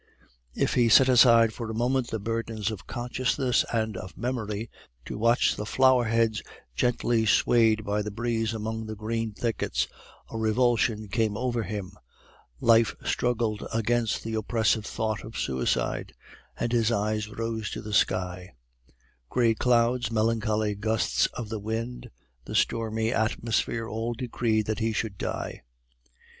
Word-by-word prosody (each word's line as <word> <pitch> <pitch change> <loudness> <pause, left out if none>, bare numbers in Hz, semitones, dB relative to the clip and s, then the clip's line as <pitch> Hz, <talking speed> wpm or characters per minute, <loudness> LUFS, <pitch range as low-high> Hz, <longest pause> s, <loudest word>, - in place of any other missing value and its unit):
If - - +1
he 120 -2 +3
set 130 +4 +7
aside 115 -3 +6
for 115 -1 -6
a 110 - -4
moment 125 +2 +1
the 110 - -3
burdens 115 0 -2
of 95 -5 -8
consciousness 125 +1 0
and 110 -2 -1
of 95 0 -8
memory, 115 -3 -3 0.4
to - - -6
watch 115 +3 +3
the - - -4
flower 130 -1 +4
heads 115 -1 +1 0.3
gently 120 - +1
swayed 110 -1 +3
by 105 +1 0
the 105 - -3
breeze 115 +1 -1
among 110 0 -4
the 110 - -5
green 110 +1 -2
thickets, 115 +1 -1 0.4
a 115 - -4
revulsion 110 -1 +1
came 110 0 0
over 120 -1 -1
him, 100 -2 -5 0.7
life 115 -1 +4
struggled 115 -3 0
against 115 0 0
the 115 - -4
oppressive 110 -1 +1
thought 110 -1 -2
of 110 - -8
suicide, 65 -1 -1 0.5
and 120 - -1
his 115 -1 +2
eyes 105 0 -1
rose 110 -1 -3
to - - -5
the 105 0 -6
sky: 90 -5 0 0.7
gray 115 -2 +3
clouds, 120 +1 +2
melancholy 110 -1 +1
gusts 110 +2 +1
of 115 -4 -5
the 110 -1 -3
wind, 115 +4 -4 0.4
the - - -6
stormy 115 0 +1
atmosphere, 115 0 0
all 115 +2 -3
decreed 115 -3 0
that 110 +2 -2
he 110 0 0
should 110 -2 -2
die. - - -4
115 Hz, 145 wpm, -27 LUFS, 110-120 Hz, 0.7 s, set